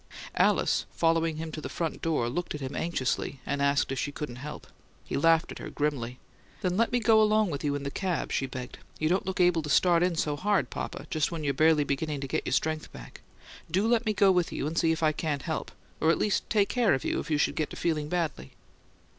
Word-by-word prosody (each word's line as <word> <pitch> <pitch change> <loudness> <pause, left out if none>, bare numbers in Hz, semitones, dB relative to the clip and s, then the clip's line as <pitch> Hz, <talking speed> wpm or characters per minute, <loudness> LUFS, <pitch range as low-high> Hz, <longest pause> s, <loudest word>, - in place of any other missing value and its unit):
Alice, - - +2
following 165 -1 +1
him 160 0 -5
to 155 - -6
the - - -5
front 165 -2 -3
door, 155 -8 0
looked 175 +7 -3
at - - -5
him 135 +1 -5
anxiously 140 -4 -2
and 140 0 -2
asked 140 -1 +2
if 135 - -2
she 145 - -2
couldn't 140 -4 -6
help. 150 +3 -7 0.4
He - - -4
laughed 165 +3 +3
at - - -8
her - - -6
grimly. 130 -5 -2 0.4
"Then 180 -3 0
let 230 +3 +2
me 245 - +2
go 220 -1 +5
along 215 -2 +3
with 140 - -4
you 145 -1 0
in 145 - -4
the 140 - -3
cab," 180 0 -2
she 135 - 0
begged. 125 -1 -7 0.2
"You 155 - 0
don't 185 +2 +1
look 190 - -3
able 175 -2 +4
to 150 - -6
start 170 +2 +4
in 180 -1 +2
so 150 -2 0
hard, 200 +6 0
papa, - - -5
just 155 +1 0
when 165 -2 -4
you're 140 -1 +1
barely 155 +1 +4
beginning 145 +1 -2
to 135 - -4
get - - -2
your - - -1
strength 155 0 -1
back. - - -11 0.5
Do 190 +6 +1
let 235 0 +2
me 215 - +2
go 195 -1 +5
with 180 -2 +1
you - - -3
and 155 +2 -3
see 165 -1 +3
if 160 0 -2
I 155 - +4
can't 150 -2 -2
help 160 -1 -3 0.3
or 160 - +2
at 165 - +4
least 210 - 0
take 205 -2 +3
care 235 - +3
of 130 - -5
you - - 0
if 165 - -6
you 150 - +2
should - - +1
get 155 - -1
to - - -8
feeling 155 -3 -1
badly." 155 - -2
160 Hz, 250 wpm, -28 LUFS, 145-180 Hz, 0.5 s, go